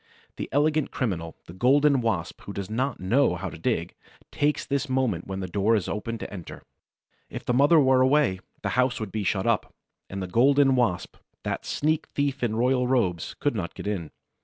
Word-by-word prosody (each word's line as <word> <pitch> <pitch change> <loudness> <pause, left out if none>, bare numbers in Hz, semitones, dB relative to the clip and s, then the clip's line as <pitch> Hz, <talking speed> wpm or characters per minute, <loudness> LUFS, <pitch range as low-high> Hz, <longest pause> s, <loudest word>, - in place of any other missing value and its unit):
The - - -5
elegant 150 +1 +2
criminal, 85 - -3
the 85 - -11
Golden 135 +6 +4
Wasp 95 -7 -2
who 100 - -8
does 100 +1 -5
not 130 +5 -1
know 110 +2 +2
how 90 0 -5
to - - -9
dig, - - -1 0.4
takes 145 +1 0
this 140 0 -1
moment 130 -10 0
when 95 0 -4
the 95 - -3
door 100 +5 +2
is 100 -4 -1
open 115 +2 -3
to - - -7
enter. 90 -5 -9 0.7
If - - -7
the 125 - +1
mother 145 +6 +5
were 130 -2 +4
away, 130 -7 +3 0.2
the - - 0
house 125 -1 +1
would 110 -3 -5
be 110 -2 -2
shut 95 0 0
up, 115 -3 0 0.3
and 95 - -5
the 95 - -3
Golden 135 +8 +4
Wasp, 120 -8 0 0.3
that - - -3
sneak 155 +1 0
thief 140 -1 0
in 115 -3 0
royal 125 +2 +2
robes, 95 -10 0
could 145 - 0
not 95 -7 -4
get - - -8
in. 95 -7 -3
120 Hz, 200 wpm, -26 LUFS, 95-135 Hz, 0.7 s, mother